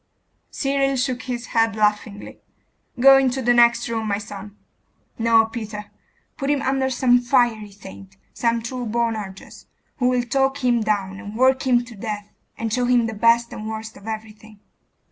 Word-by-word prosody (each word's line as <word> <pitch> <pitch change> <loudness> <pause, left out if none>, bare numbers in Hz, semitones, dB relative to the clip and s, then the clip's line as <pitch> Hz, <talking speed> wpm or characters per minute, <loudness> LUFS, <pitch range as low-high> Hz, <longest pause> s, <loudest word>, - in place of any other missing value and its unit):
Cyril 275 -1 0
shook 255 -1 -1
his 245 -2 -5
head 225 -2 +2
laughingly.... 210 -1 -1 0.6
'Go 270 +2 +8
into 265 -1 0
the 245 -1 +3
next 235 0 +4
room, 225 -1 -3
my 200 -1 0
son.... 205 0 -9 0.6
No, 225 -1 +4
Peter, 215 -2 -7 0.5
put 275 -1 -3
him 285 -1 +1
under 265 0 0
some 245 -1 +3
fiery 240 -4 +1
saint, 195 -1 -13 0.2
some 230 -1 0
true 245 0 -5
Boanerges, 215 -4 -4 0.3
who 250 - +1
will 250 -1 +1
talk 270 +2 0
him 240 -2 +2
down, 200 -3 -1
and 210 0 -9
work 260 +2 +2
him 245 -1 +3
to 245 - -12
death, 210 0 -6 0.3
and 225 -1 -3
show 250 +1 +1
him 245 -1 +3
the 225 - -3
best 230 +2 +2
and 215 0 -6
worst 220 0 -6
of 200 - -14
everything. 220 -1 -8
230 Hz, 165 wpm, -22 LUFS, 215-250 Hz, 0.6 s, Go